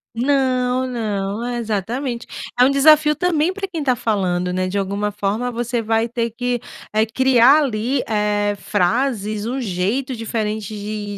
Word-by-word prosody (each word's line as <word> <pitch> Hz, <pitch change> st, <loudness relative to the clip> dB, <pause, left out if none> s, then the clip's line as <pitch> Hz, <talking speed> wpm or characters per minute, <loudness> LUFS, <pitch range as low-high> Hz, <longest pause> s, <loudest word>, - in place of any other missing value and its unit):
Não, 255 Hz, 0 st, +1 dB
não, 215 Hz, -3 st, -3 dB
é 245 Hz, 0 st, -3 dB
exatamente. 235 Hz, +3 st, -3 dB, 0.3 s
É -, -, +8 dB
um 255 Hz, -, +5 dB
desafio 300 Hz, +2 st, +5 dB
também 345 Hz, -1 st, +1 dB
para 390 Hz, 0 st, -4 dB
quem 330 Hz, -5 st, -4 dB
tá 255 Hz, -3 st, +2 dB
falando, 185 Hz, -6 st, -1 dB
né? 185 Hz, 0 st, 0 dB
De 195 Hz, -, -2 dB
alguma 200 Hz, +1 st, -1 dB
forma, 210 Hz, +5 st, -2 dB
você 240 Hz, 0 st, -2 dB
vai 225 Hz, +1 st, +1 dB
ter 235 Hz, 0 st, -2 dB
que, 245 Hz, +2 st, -2 dB, 0.3 s
eh, 215 Hz, -, +3 dB
criar 260 Hz, +5 st, +5 dB
ali, 250 Hz, +1 st, -1 dB
eh, 210 Hz, -1 st, +1 dB
frases, 210 Hz, +1 st, 0 dB
um 255 Hz, +3 st, -2 dB
jeito 230 Hz, +5 st, -1 dB
diferente 215 Hz, -2 st, -3 dB
de 205 Hz, 0 st, -5 dB
230 Hz, 155 wpm, -20 LUFS, 210-255 Hz, 0.3 s, É